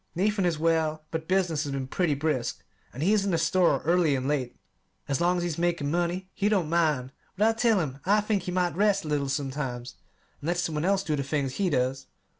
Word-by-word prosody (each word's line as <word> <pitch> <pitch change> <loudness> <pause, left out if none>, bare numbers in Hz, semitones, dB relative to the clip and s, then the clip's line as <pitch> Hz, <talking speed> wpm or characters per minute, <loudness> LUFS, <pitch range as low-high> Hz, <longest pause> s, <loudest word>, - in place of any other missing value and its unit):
Nathan 195 +1 +1
is 165 -3 0
well, 160 -1 +1
but 160 0 -4
business 180 -5 +1
has 140 - -4
been 135 -1 -2
pretty 155 +3 0
brisk, 145 -4 -2 0.3
and 135 - -5
he 195 +5 +3
is 210 -2 +3
in 200 - -1
the 170 - +2
store 165 -3 +2
early 165 -3 +3
and 130 0 -2
late. 135 -4 -1 0.5
As 140 +1 -1
long 175 +1 +3
as 175 - -1
he's 170 -2 -3
making 170 -4 0
money, 175 +2 -1
he 205 0 +1
don't 190 -7 +1
mind; 150 -7 +1 0.3
but 210 +3 +4
I 225 - +3
tell 225 -2 +3
him 140 -5 -3
I 205 +3 +4
think 210 -1 0
he 180 - -5
might 180 -3 0
rest 200 -1 +2
a - - -5
little 145 -2 0
sometimes, 135 -3 -3 0.4
and 145 - -6
let 175 +1 +1
some 175 -2 -1
one 150 +2 -1
else 195 0 +2
do 155 -5 -1
the 140 - -1
things 140 -1 -2
he 195 -2 +1
does. 130 -1 -1
165 Hz, 235 wpm, -27 LUFS, 140-185 Hz, 0.5 s, but